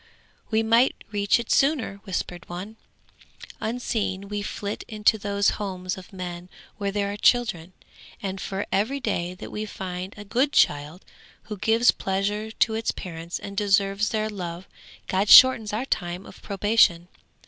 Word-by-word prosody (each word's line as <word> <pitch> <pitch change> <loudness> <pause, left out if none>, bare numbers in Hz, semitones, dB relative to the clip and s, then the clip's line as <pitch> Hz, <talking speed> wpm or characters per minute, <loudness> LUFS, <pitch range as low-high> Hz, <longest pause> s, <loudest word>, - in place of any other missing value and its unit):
'We 220 0 +2
might 230 +3 +4 0.2
reach 205 +1 +2
it 235 - -5
sooner,' 275 -8 +2
whispered 180 -2 -4
one. 185 +5 -7 0.8
'Unseen 220 -4 -2
we 205 0 -3
flit 205 0 -5
into 215 0 +2
those 200 0 +1
homes 185 -2 -3
of 185 -1 -12
men 180 -2 -7 0.3
where 200 -1 -1
there 200 0 -1
are 205 - -5
children, 195 -8 +2 0.5
and 195 -1 -5
for 195 +1 -3
every 220 +9 0
day 180 -7 -2
that - - -9
we 215 0 -4
find 185 -1 -6
a 205 - -9
good 255 +7 +1
child 150 +5 +1 0.4
who 210 -1 -7
gives 225 +4 +4
pleasure 205 +3 -2
to 220 0 +1
its 225 +1 -2
parents 170 -1 -5
and 200 - -8
deserves 200 0 +2
their 215 -1 -1
love 180 -4 -6 0.4
God 195 +2 0
shortens 245 -5 +8
our 220 +5 -2
time 175 -6 -3
of - - -14
probation. 200 -4 +2
200 Hz, 155 wpm, -25 LUFS, 185-220 Hz, 0.8 s, shortens